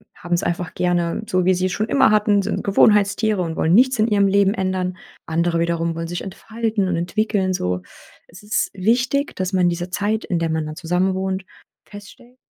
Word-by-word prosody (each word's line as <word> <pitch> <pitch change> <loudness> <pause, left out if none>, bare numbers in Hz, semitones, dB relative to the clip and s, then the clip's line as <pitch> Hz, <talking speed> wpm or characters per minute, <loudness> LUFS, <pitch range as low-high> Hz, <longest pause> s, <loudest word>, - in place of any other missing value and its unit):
haben 175 0 -5
es 170 - +2
einfach 175 0 -3
gerne, 175 +1 0
so 185 -2 +1
wie 185 - +4
sie 185 +1 0
es 185 - -4
schon 215 +4 -2
immer 275 - +4
hatten, 210 -1 +3
sind - - -3
Gewohnheitstiere 205 0 +3
und 165 -2 -3
wollen 165 +2 +2
nichts 255 +1 +4
in 215 - +3
ihrem 205 -3 +3
Leben 200 +1 +3
ändern. 185 -1 -2 0.3
Andere 170 +1 0
wiederum 170 0 0
wollen 165 0 -5
sich 175 +1 -5
entfalten 220 +1 -3
und 180 - 0
entwickeln, 190 +2 0
so. 90 - -2 0.5
Es 175 +2 -14
ist 210 +1 -1
wichtig, 245 +8 0
dass 185 +1 -3
man 185 -1 +2
in 175 - +4
dieser 175 +1 -4
Zeit, 210 +3 -1
in 175 - -1
der 165 -1 -1
man 160 -1 -1
dann 155 0 -7
zusammenwohnt, 190 +3 -1 0.4
feststellt 240 +5 -14
185 Hz, 200 wpm, -21 LUFS, 175-210 Hz, 0.5 s, wie